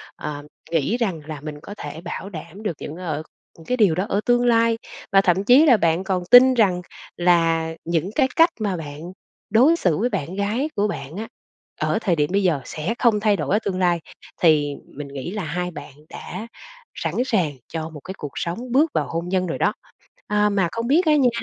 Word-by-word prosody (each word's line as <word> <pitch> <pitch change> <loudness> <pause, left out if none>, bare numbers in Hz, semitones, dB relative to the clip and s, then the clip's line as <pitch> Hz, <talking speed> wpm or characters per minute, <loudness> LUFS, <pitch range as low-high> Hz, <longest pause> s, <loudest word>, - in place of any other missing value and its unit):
ờ, 145 -1 -6 0.3
nghĩ 165 - +1
rằng 190 -10 -1
là 155 -3 -6
mình 150 0 -7
có 205 - -9
thể 160 - -7
bảo 195 +2 -6
đảm 170 +3 -9
được 185 -8 -3
những 150 - -7
ở 155 -4 -4 0.4
cái 250 - 0
điều 200 -8 +4
đó 185 +4 -1
ở 200 - +1
tương 245 0 +3
lai, 230 -1 +3 0.3
và 195 - +6
thậm 190 +1 +2
chí 255 +8 +6
là 255 -7 +6
bạn 170 -1 +1
còn 190 -2 -1
tin 255 +1 +9
rằng 185 -6 +3 0.4
là 165 -2 +2
những 170 +3 -1
cái 270 -3 +3
cách 330 +1 +6
mà 195 -4 -1
bạn 150 -2 -7 0.5
đối 255 +10 +5
xử 180 - +1
với 240 +5 +1
bạn 185 - -3
gái 215 +9 -1
của 205 +1 +1
bạn 140 -5 -6
á, 220 +2 -4 0.5
ở 220 - +1
thời 180 -6 +1
điểm 150 -2 +1
bây 200 0 +2
giờ 155 -7 +2
sẽ 160 +8 -3
không 230 -4 +3
thay 210 -1 +3
đổi 195 - 0
ở - - +3
tương 185 -2 -1
lai 175 -2 +2 0.4
thì 150 -4 +3
mình 145 0 -8
nghĩ 140 +5 -6
là 210 -3 -4
hai 180 +3 -3
bạn 150 - -10 0.2
đã 200 +6 -7 0.5
sẵn 165 -1 -3
sàng 190 - +1 0.2
cho 160 -1 -5
một 155 -2 -10
cái 190 - -8
cuộc 145 -2 -6
sống 230 +9 -4
bước 295 +5 +3
vào - - 0
hôn 170 +2 -3
nhân 185 -1 0
rồi 165 - -3
đó. - - +1 0.5
À, 210 0 +2
mà 195 -4 +1
không 230 0 -3
biết 320 +6 +3
á 305 - +5
nha, 265 -4 +4
185 Hz, 220 wpm, -22 LUFS, 160-225 Hz, 0.5 s, tin